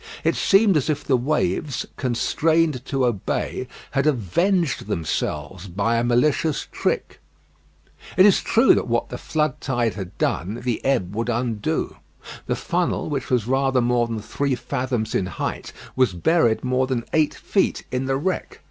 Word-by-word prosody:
It - - +2
seemed 195 -3 +4
as 150 - -1
if 150 -1 -1
the 135 - +2
waves, 135 - 0
constrained 150 +3 +1
to 135 -2 0
obey, 120 +2 -2 0.2
had 140 +1 +1
avenged 155 - +1
themselves 85 +3 -3
by 100 +6 0
a 115 - +1
malicious 135 +5 +1
trick. - - -2 1.0
It 185 - +8
is 205 - +5
true 230 +4 +5
that - - 0
what 120 0 0
the 125 - -6
flood 150 -4 -1
tide 120 -5 0
had 95 -2 -8
done, 105 +8 -1
the 120 -3 -2
ebb 120 -9 0
would 115 +2 -1
undo. 115 -3 -1 0.5
The - - 0
funnel, - - -1
which 135 -3 -3
was 125 -4 +1
rather 135 +1 +2
more 120 -1 +2
than 115 -1 -3
three 140 +5 -1
fathoms 125 -4 -2
in 90 - 0
height, 95 - -4 0.2
was 130 -7 +3
buried 115 - +2
more 130 0 +1
than 125 -3 -2
eight 155 -2 +2
feet 195 - 0
in 130 +1 -1
the 135 0 0
wreck. 185 +7 -3
125 Hz, 160 wpm, -23 LUFS, 115-150 Hz, 1.0 s, It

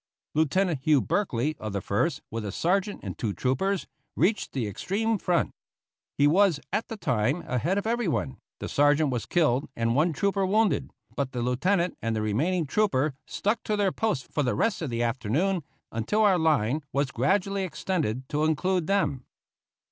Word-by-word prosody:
Lieutenant 160 +1 +1
Hugh 150 0 +4
Berkely, 150 - 0
of 110 -2 -5
the 100 - 0
First, - - -1
with 115 0 -3
a 100 - -4
sergeant 195 - 0
and - - -5
two 110 -5 -1
troopers, 180 - 0 0.3
reached 205 +6 +1
the 130 -4 -2
extreme 205 - -1
front. 175 -1 +1 0.7
He 145 - +4
was, 175 +1 +4
at 210 +3 0
the 225 - -6
time, 130 - 0
ahead 150 - 0
of 200 - -1
everyone; 215 - -1 0.2
the - - -4
sergeant 145 0 +3
was 120 -3 -3
killed 150 -6 +2
and 115 0 +1
one 160 +5 +3
trooper 195 +5 0
wounded; 210 +2 +2 0.3
but 135 -2 -2
the 120 -1 -2
lieutenant 170 +9 +1
and 115 0 -1
the 110 - -1
remaining 155 - 0
trooper 155 -4 +1
stuck 210 +3 -1
to 215 - 0
their 200 -2 +2
post 205 - -2
for 150 - 0
the 125 -3 0
rest 225 - 0
of 155 - -2
the 120 0 -1
afternoon 135 - 0 0.3
until 115 - 0
our 195 -4 +4
line 150 -3 +2
was 140 -1 0
gradually 195 - +1
extended 155 - -2
to 150 +1 +1
include 175 +2 +1
them. 150 -10 +1
155 Hz, 175 wpm, -27 LUFS, 130-195 Hz, 0.7 s, Hugh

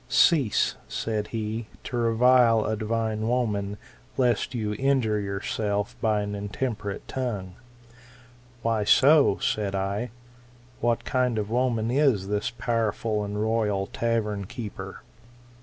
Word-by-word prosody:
Cease, 140 -3 +3
said 105 -2 -2
he, 110 0 -4 0.2
to - - -5
revile 115 -1 +4
a 110 - 0
divine 110 0 -1
woman, 105 -5 0 0.4
lest 125 0 +1
you 105 -3 -1
injure 130 -6 +2
yourself 100 +1 -2
by 110 -2 +2
an 100 0 -4
in* 100 0 -4
temperate 105 -4 -4
tongue. 105 -8 -3 1.1
Why 115 -2 +1
so? 140 +1 +5
said 100 -2 -1
I. 100 +5 -2 0.7
What 120 0 0
kind 125 -3 +1
of 105 0 -2
woman 120 -2 +1
is 125 -8 +2
this 105 0 0
powerful 115 -2 -1
and 105 0 -4
royal 105 -3 +1
tavern 105 -3 -1
keeper 115 0 -7
110 Hz, 125 wpm, -26 LUFS, 105-120 Hz, 1.1 s, so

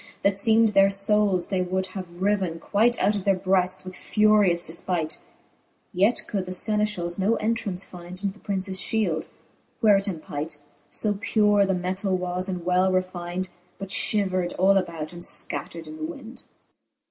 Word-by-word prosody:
That 200 - +4
ieem'd 220 +3 +4
their 195 -1 +5
foules 195 -2 +2
they 190 -2 0
wold 185 +1 -1
have 190 -2 -5 0.2
ryven 190 -5 0
quight 225 +7 +2
Out 210 - +2
of 200 - -3
their 195 0 +3
breafts 185 0 0
with 185 -1 -7
furious 210 -5 +3
defpight. 170 -1 -1 0.7
Yet 200 +7 +3
could 195 -4 -3
the - - -5
Senefchals 210 -3 -1
no 205 +4 +2
entrance 215 -4 -1
find 175 0 -11
Into 200 0 -1
the 200 +2 -12
Princes 190 -1 -2
fliield, 185 -9 0 0.5
where 210 -3 +5
it 195 - -1
empight 155 -4 -4 0.2
\ 145 - -36
So 205 -2 0
pure 210 -3 +3
the 190 - +1
metall 185 +2 -1
was, 180 +1 -3
and 180 -2 -4
well 185 +1 +3
refynd, 185 0 -2 0.3
But 195 -1 -7
lliiver'd 190 -4 +1
all 195 +2 +4
about, 170 -4 -2
and 175 - -9
fcattered 165 -1 -1
in 155 0 -9
the 155 - -7
wynd. 225 +9 -9
190 Hz, 170 wpm, -25 LUFS, 180-205 Hz, 0.7 s, their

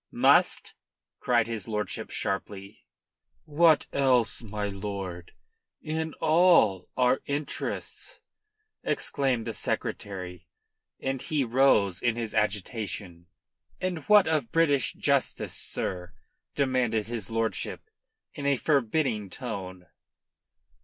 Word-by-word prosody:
"Must!" - - +3 0.5
cried 120 -3 +2
his 115 -3 -4
lordship 105 -1 -3
sharply. 100 +1 -4 0.6
"What 155 0 +4
else, 125 -5 +2
my 105 -2 -4
lord, 95 -3 -6 0.5
in 160 0 -3
all 160 - +4
our 125 +1 +3
interests?" 150 - -4 0.6
exclaimed 130 -5 0
the 115 - -3
Secretary, 90 -5 -4 0.5
and 135 -1 -2
he 150 -3 0
rose 115 -7 +3
in 120 -2 +1
his 115 -2 -4
agitation. 105 -4 -3 0.5
"And 180 -2 -2
what 210 -3 +6
of 150 -8 0
British 145 -6 +2
justice, - - 0
sir?" 90 -2 -3 0.4
demanded 125 -6 +1
his 115 -3 -4
lordship 115 0 -2 0.5
in 140 -2 -4
a 140 -1 +3
forbidding 125 -6 0
tone. 95 -6 -6
115 Hz, 100 wpm, -27 LUFS, 100-140 Hz, 0.6 s, what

